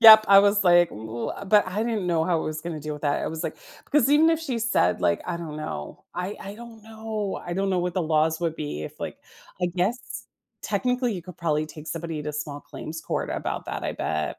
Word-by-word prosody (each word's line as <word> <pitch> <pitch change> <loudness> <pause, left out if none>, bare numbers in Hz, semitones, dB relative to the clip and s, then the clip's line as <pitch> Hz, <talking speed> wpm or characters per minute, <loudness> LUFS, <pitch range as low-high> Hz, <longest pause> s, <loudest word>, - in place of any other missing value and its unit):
Yup, 220 -1 +11
I 195 0 +9
was 205 0 +3
like, 175 -1 +6
"Ooh," 110 +2 -5 0.2
but 205 0 +5
I 205 +5 -1
didn't 215 -6 -1
know 165 -2 +2
how 170 -2 +2
I - - -3
was 155 0 -3
gonna 165 -2 -5
deal 155 +1 -4
with 150 - -10
that, 145 -2 +1
I - - -1
was 160 +1 -4
like - - -3 0.3
because 285 -2 +3
even 315 +3 +6
if 325 -1 +1
she 260 -7 -2
said, 90 - +2
like, 85 -1 +2
I 175 -1 -2
don't 160 -3 -6
know. 115 - -6
I 180 +4 -3
I 200 +1 -7
don't 230 -1 -11
know, 220 -2 -4
I 175 - -4
don't 195 +2 0
know 185 - +2
what 175 0 -1
the 185 - +1
laws 160 0 +2
would 165 -2 -1
be 145 - -4
if, 75 - -8
like - - -5 0.4
I - - +4
guess, 185 +8 -2 0.3
technically, 250 -2 0
you 180 - -5
could 180 -1 -11
probably 155 -2 0
take 155 0 -11
somebody 165 -1 -4
to 150 - -4
small 145 -1 -4
claims 160 +1 -7
court - - -2
about - - -3
that, - - -4
I - - -1
bet. 80 -1 -2
175 Hz, 240 wpm, -26 LUFS, 155-215 Hz, 0.4 s, Yup